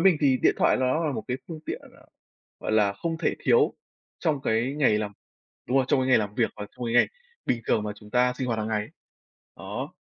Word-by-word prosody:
mình 180 -2 +5
thì 135 -3 +4
điện - - +5
thoại - - +4
nó 130 +6 +1
là 150 - 0
một - - -4
cái 125 - 0
phương 160 -2 -6
tiện, - - -3
gọi - - -15
là, - - -19 0.5
gọi - - -2
là, 105 -2 +4
không 165 +11 -3
thể - - +1
thiếu 460 -2 +4 0.4
trong 155 -5 0
cái 120 +4 +1
ngày 110 -8 +3
làm 105 -1 -3 0.5
đúng 130 +3 +1
rồi, 135 - +4
trong 135 - +3
cái 130 - 0
ngày 130 - +6
làm 105 -1 -3
việc 115 - +1
hoặc 105 -1 -6
trong 125 - -5
cái 115 - -2
ngày 120 - +6 0.4
bình 120 - +1
thường 105 - +2
mà 105 0 -3
chúng 105 0 -15
ta 125 0 +3
sinh 130 - -1
hoạt 115 -3 -1
hàng 110 0 -2
ngày. 105 -1 -1 0.7
Đó. - - -6
125 Hz, 250 wpm, -26 LUFS, 110-140 Hz, 0.7 s, ngày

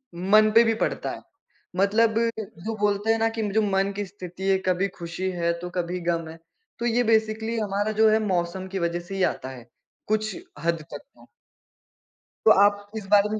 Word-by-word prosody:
मन 210 +5 +4
पे 230 - +8
भी 225 -1 +2
पड़ता - - -1
है, - - -8 0.5
मतलब 215 +4 +3 0.5
जो 225 0 -2
बोलते 205 +1 +1
हैं 225 - +3
ना 225 0 +2
कि - - 0
म 205 - -2
जो 220 - +3
मन 195 -1 +1
की 205 0 -3
स्थिति 185 0 -7
है, 190 - +4
कभी 185 +2 +2
खुशी 175 +2 -4
है, 170 -1 0
तो 180 0 -6
कभी 180 0 -3
गम 170 -1 -1
है, 165 - -10 0.4
तो 235 - -2
ये 240 +1 +2
बेसिकली 220 0 +1
हमारा 205 +1 -1
जो 220 - +7
है 220 +1 +4
मौसम 185 +1 -1
की 195 - -2
वज़ह 170 0 -1
से 175 +3 -8
ही 190 - 0
आता 130 - -8
है, 125 -3 -11 0.4
कुछ 215 0 0 0.3
हद 165 -1 0
तक - - -5
तो। 280 -1 -22 1.2
तो 220 - +8
आप 205 0 +1
इस 205 - -6
बारे 205 0 +5
में 215 0 -2
200 Hz, 205 wpm, -25 LUFS, 180-215 Hz, 1.2 s, पे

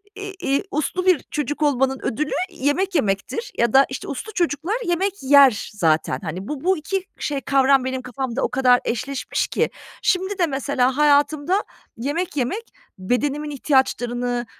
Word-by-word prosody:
i 405 -1 -7
iii, 275 +5 +2
uslu 355 +5 -1
bir 365 -6 +3
çocuk 295 +1 -3
olmanın 270 -2 +1
ödülü 300 +6 -2 0.2
yemek 345 +4 -1
yemektir 220 - -1
ya 235 0 +2
da, 270 +1 +7
işte, 260 - -6
uslu 410 - -6
çocuklar 345 +2 0
yemek 370 0 -1
yer 270 -5 +5
zaten. 160 -8 +1
Hani, 185 +5 -5
bu 295 -1 -5
bu 375 0 +2
2 370 +5 -2 0.2
şey, 285 -2 -2
kavram 270 +1 +3
benim 260 0 -2
kafamda 255 0 -4
o - - +1
kadar 250 -1 +4
eşleşmiş 255 +3 -2
ki - - 0 0.3
şimdi 380 0 0
de 350 - +3
mesela 270 -2 0
hayatımda 300 +5 +3 0.3
yemek 295 +7 -3
yemek 325 - -1 0.4
bedenimin 285 +9 -1
ihtiyaçlarını, 245 -3 0
280 Hz, 150 wpm, -22 LUFS, 255-340 Hz, 0.4 s, da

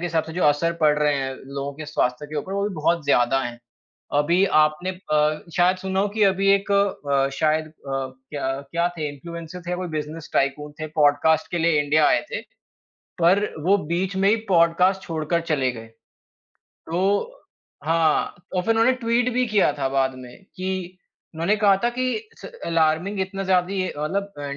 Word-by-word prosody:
के 175 - -2
हिसाब 160 -2 0
से 160 - -8
जो 180 +2 -2
असर 150 +3 +3
पड़ 150 -1 +4
रहे 150 -1 +2
हैं 135 -1 -2
लोगों 140 +1 -5
के 155 +1 -8
स्वास्थ्य 145 -1 -1
के 150 +1 -7
ऊपर, 185 +7 -5
वो 200 0 -1
भी 190 - -7
बहुत 165 0 0
ज़्यादा 135 -1 +3
हैं। 120 -1 -5 0.6
अभी 170 +6 +3 0.2
आपने 155 +4 +1
अ, 155 -4 0 0.2
शायद 180 +1 +4
सुना 190 +1 -2
हो 205 - +1
कि 210 +1 -1
अभी 195 0 +2
एक 200 +1 -2
अ, 140 -9 +1
शायद 155 0 +1
अ, 155 - -16 0.6
क्या 135 -2 -3
क्या 170 +1 +1
थे 150 - -2
इन्फ्लुएंसर 170 +4 -8
थे, 180 - -2
कोई 180 0 -4
बिज़नेस 150 +1 -7
टायकून 145 +2 0
थे 155 - -3
पॉडकास्ट 150 +2 +3
के 175 - -1
लिए 165 -2 +3
इंडिया 150 +1 +3
आए - - +3
थे, - - -3 0.8
पर 190 +5 +4 0.2
वो 200 - +5 0.2
बीच 190 +2 -1
में 195 +1 +3
ही 220 - +4
पॉडकास्ट 180 +2 +3
छोड़कर 165 -1 -2
चले 130 -4 +1
गए। 115 -1 -10 0.8
तो 170 +3 -5 0.8
हाँ, 165 -1 +2 0.2
और 180 - +2
फिर 225 - +1
उन्होंने 230 +3 +4
ट्वीट 235 +2 +2
भी 250 +1 +2
किया 205 -8 +3
था 135 - 0
बाद 135 -1 0
में 125 -1 -11 0.2
कि, 185 -1 -4 0.4
उन्होंने 170 +6 +1
कहा 200 -2 +5
था 240 - +3
कि 255 - +1 0.4
स - - -9 0.2
अलार्मिंग 165 +4 +1
इतना 195 +1 -3
ज़्यादा 185 0 +1
ही 185 -1 0
मतलब 200 +6 -2
अ, 145 - -5
165 Hz, 190 wpm, -23 LUFS, 150-190 Hz, 0.8 s, वो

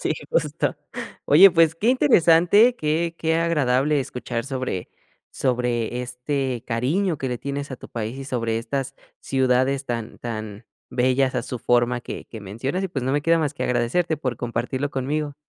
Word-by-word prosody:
Sí - - +1 0.2
justo, - - 0 0.5
oye 195 - +8
pues, 165 -2 +4
qué 210 +7 0
interesante 180 - +5
qué 165 +1 -1
qué 160 0 +1
agradable 150 -3 +2
escuchar 125 -2 -4
sobre 130 -9 -4 0.4
sobre 120 -2 -1
este 125 0 -3
cariño 155 +10 0
que 130 - -2
le 125 -1 -3
tienes 140 +2 -4
a 130 - -5
tu - - -12
país 115 +1 -4
y 135 - -6
sobre 115 -4 -1
estas 135 +3 -3 0.3
ciudades 130 +1 +1
tan 115 -3 -5
tan 110 -2 -6 0.2
bellas 130 +1 +2
a - - 0
su 125 - -5
forma 120 +1 +2
que - - -7
que 110 - -9
mencionas 120 - -3
y - - -2
pues, 140 -7 -4
no 130 - 0
me 145 - +1
queda 165 +2 +3
más 150 -3 -1
que - - -4
agradecerte 125 +8 +1
por 130 -5 -3
compartirlo 125 +4 -2
conmigo. 145 +2 -2
130 Hz, 170 wpm, -23 LUFS, 120-155 Hz, 0.5 s, oye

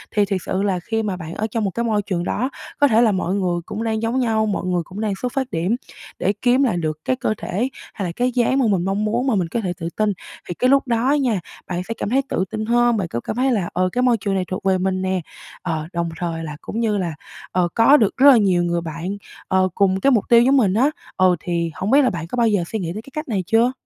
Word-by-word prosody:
Thì 205 -1 +4
thiệt 195 -2 -2
sự 190 - -1
là 190 -3 0
khi 225 +5 -2
mà 200 -4 -2
bạn 165 -1 -7
ở 220 - -2
trong 225 -1 -1
một 195 - 0
cái 235 - -2
môi 215 -3 +1
trường 185 -4 -2
đó 255 +8 -1 0.3
có 285 - +6
thể 225 -2 +4
là 225 -3 +4
mọi 185 -1 -1
người 180 -3 0
cũng 215 +4 -4
đang 220 -1 -1
giống 230 +3 0
nhau, 220 -3 +1
mọi 205 - -2
người 180 -1 0
cũng 190 +6 -8
đang 215 -2 0
xuất 250 -1 -2
phát 265 -2 -2
điểm 175 +7 0 0.4
để 200 - +1
kiếm 255 +2 +4
lại 230 -9 +1
được 155 -2 -2
cái 260 - +1
cơ 230 -4 -1
thể 230 +9 -2 0.2
hay 195 - -4
là - - -3
cái 250 +1 +1
dáng 250 +2 +2
mà 260 - +3
mình 185 -3 +1
mong 200 +2 0
muốn 240 +5 0
mà 250 - +2
mình 180 -3 0
có 230 +7 -2
thể 180 -3 -2
tự 165 -1 -3
tin. 215 -1 +2 0.3
Thì - - -3
cái 255 +8 +1
lúc 275 -1 +3
đó 240 +3 +1
nha, 230 -7 +1 0.3
bạn 180 0 -2
sẽ 230 - -2
cảm - - -3
thấy 270 +3 +3
tự 185 - 0
tin 215 0 -3
hơn, 240 0 +3
bạn 185 -4 -1
có 120 - -3
cảm 215 - -5
thấy 260 +2 +2
là: 200 -8 0
"Ờ, 185 +1 +1
cái 250 - 0
môi 250 -2 +3
trường 200 -1 -2
này 185 -1 0
thuộc 185 - -3
về 190 -1 +2
mình 185 0 -1
nè." 185 -1 0 0.4
Ờ, 160 -3 -3
đồng 170 -1 -1
thời 165 -2 -3
là 150 -2 -6
cũng 225 - -5
như 215 -3 +1
là, 175 -4 -2 0.4
ờ, 180 -1 +2
có 275 +6 +6
được 210 -4 +1
rất 280 +2 +8
là 245 - +6
nhiều 185 -4 +3
người 170 0 0
bạn, 170 +4 -5 0.3
ờ, 185 0 +2
cùng 190 -1 +2
cái 275 - +3
mục 225 -5 +3
tiêu 235 -1 +7
giống 270 +3 +4
mình 200 -7 +3
á. 255 +7 +3 0.3
Ờ, 185 -1 +4
thì 170 -2 -2
hông 190 +7 -2
biết 280 +2 +6
là 255 - +3
bạn 165 -4 -5
có 210 - -5
bao 235 -2 +3
giờ 205 -5 +2
suy 220 - -3
nghĩ 170 -2 -3
tới 215 - -5
cái 270 +4 -16
cách 305 0 -4
này 200 -7 -1
chưa? 230 +3 +3
205 Hz, 290 wpm, -21 LUFS, 180-235 Hz, 0.4 s, rất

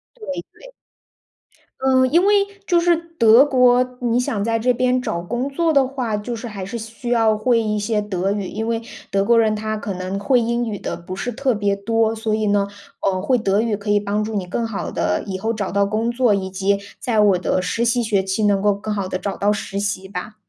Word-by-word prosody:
对 450 -3 -11 0.3
对。 - - -15 1.1
嗯， 260 -1 +3
因 345 +4 +4
为 410 - +4 0.3
就 350 -3 +3
是 345 0 +3
德 300 -8 +4
国， 250 -3 +4 0.2
你 240 -1 +1
想 225 -4 -1
在 230 0 +1
这 250 +3 +2
边 255 +1 +1
找 170 -8 -3
工 240 +9 -3
作 325 +3 +1
的 275 -2 +4
话， 255 -5 -3
就 210 +4 -4
是 235 +2 -6
还 200 -3 -6
是 230 +5 -5
需 225 +2 -7
要 225 -3 +3
会 230 +1 +2
一 215 -1 -1
些 210 +1 0
德 195 -2 -2
语， 200 -2 -2
因 220 +1 -4
为 230 -1 -1 0.3
德 195 0 +1
国 235 +2 +4
人 220 -1 +3
他 215 0 -3
可 210 -2 -4
能 185 +1 -4
会 245 +6 +2
英 235 +1 0
语 210 -3 -4
的 - - -4
不 175 +2 -8
是 245 +5 -3
特 265 +1 0
别 205 -2 0
多。 225 +2 0
所 220 -1 -2
以 215 -1 0
呢， 205 -1 +2 0.3
呃， 185 -1 0
会 255 -2 +2
德 200 -2 +1
语 225 -2 0
可 205 +1 -7
以 205 0 +4
帮 205 +1 -1
助 220 +1 -4
你 190 - -1
更 230 +6 -2
好 225 -3 -4
地 - - -1
以 190 -2 -4
后 225 +4 -1
找 205 -3 -3
到 200 +1 +2
工 220 +3 -1
作， 240 -3 +2
以 190 -1 -1
及 195 +1 0 0.2
在 230 -3 0
我 205 -3 +5
的 185 +1 0
实 215 +6 -1
习 240 +1 +2
学 210 -4 +1
期， 190 +3 -1
能 200 -1 +2
够 205 0 +3
更 210 +2 -4
好 200 -2 -2
地 185 - -3
找 200 0 -3
到 205 +1 +1
实 205 -1 -4
习 200 -1 -2
吧。 200 +3 -6
215 Hz, 255 characters per minute, -20 LUFS, 200-240 Hz, 1.1 s, 我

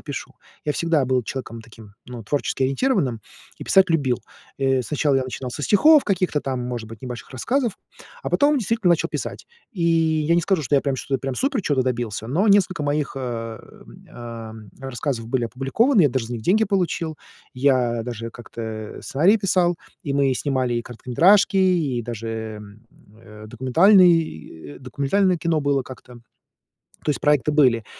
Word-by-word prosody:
и - - -19
пишу. - - -7 0.3
Я 150 - 0
всегда 165 -4 +1
был 130 -1 +1
человеком 115 -1 -6
таким, 110 -2 -15
ну, 120 -2 -8
творчески-ориентированным 135 - 0 0.4
и - - -8
писать 190 -2 +4
любил. 135 -7 +1 0.4
Э, 135 -1 +1
сначала 145 +1 0
я 130 - +1
начинал 130 0 -6
со 145 - -6
стихов 300 - +5
каких-то 185 -6 0
там, 130 -3 -3
может 120 -3 -5
быть, 115 +1 -12
небольших 125 -2 -7
рассказов, 240 - -1 0.5
а - - -4
потом, 290 0 +3
действительно, 220 -4 +1
начал 170 - +2
писать. - - -6 0.3
И 180 -6 -4
я 160 -1 +2
не 175 - +3
скажу, 185 -1 0
что 145 +1 -1
я 140 - +5
прям 135 -1 -2
что 135 +1 -4
я - - +1
прям 135 -1 -4
супер 275 - 0
чего-то 140 -6 +1
добился, 120 -4 -3
но 165 - +1
несколько 190 -5 +3
моих, 145 0 -1
э, 115 -3 -5 0.5
эм, 115 -3 -9
рассказов 130 -2 -4
были 120 +1 0
опубликованы. 150 - +2
Я 145 - +5
даже 130 -3 -2
за 120 - -5
них 115 - -6
деньги 210 - +3
получил. 175 -6 -1 0.4
Я 125 -3 +1
даже 115 -1 -6
как-то 110 -2 -8
сценарии 175 +10 +3
писал, 180 -4 +1 0.3
и 140 - -3
мы 140 -1 +2
снимали 130 -2 -1
и 120 - -1
короткометражки, 170 - +3
и 170 -10 +2
даже, 110 -1 -6 0.6
э, 105 -1 -13
документальные 130 - +2
документальное 140 +9 0
кино 165 -1 0
было 140 -2 +1
как-то. 125 -1 -12 0.9
То 150 - +2
есть - - -5
проекты 150 0 +2
были. 125 -7 +3
135 Hz, 165 wpm, -22 LUFS, 120-170 Hz, 0.9 s, стихов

